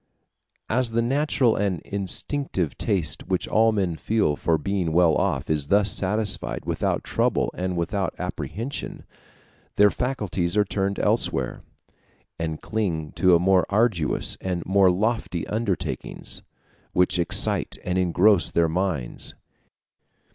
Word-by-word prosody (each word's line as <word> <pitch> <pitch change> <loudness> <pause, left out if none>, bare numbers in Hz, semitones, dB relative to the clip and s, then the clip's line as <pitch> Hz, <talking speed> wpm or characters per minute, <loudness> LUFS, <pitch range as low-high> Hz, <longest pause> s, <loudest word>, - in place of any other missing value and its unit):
As 120 +2 +1
the 115 +1 0
natural 130 -2 +2
and 95 -4 0
instinctive 100 - -2
taste 90 - -2
which 95 -1 -1
all 110 +1 +4
men 95 -6 -1
feel 105 -8 +1
for 80 +2 +1
being 90 0 -1
well 85 -1 +4
off - - 0
is 75 -3 -1
thus 100 +2 +3
satisfied 100 0 0
without - - -1
trouble - - 0
and 90 0 -3
without 95 +2 -1
apprehension, 120 +8 -5 0.7
their 105 0 +5
faculties 105 -8 -1
are 105 - +4
turned 100 0 -1
elsewhere, - - 0 0.8
and 80 -2 -4
cling 85 -9 -2
to 90 -3 +4
more 90 +1 +3
arduous 100 -7 +1
and 90 -2 -3
more 95 0 +4
lofty 100 -2 -1
undertakings, 105 -4 -3 0.5
which 90 0 +2
excite 85 - 0
and 90 0 0
engross 90 +2 +3
their 85 -1 +2
minds. 80 -7 -1
95 Hz, 125 wpm, -24 LUFS, 85-105 Hz, 0.8 s, their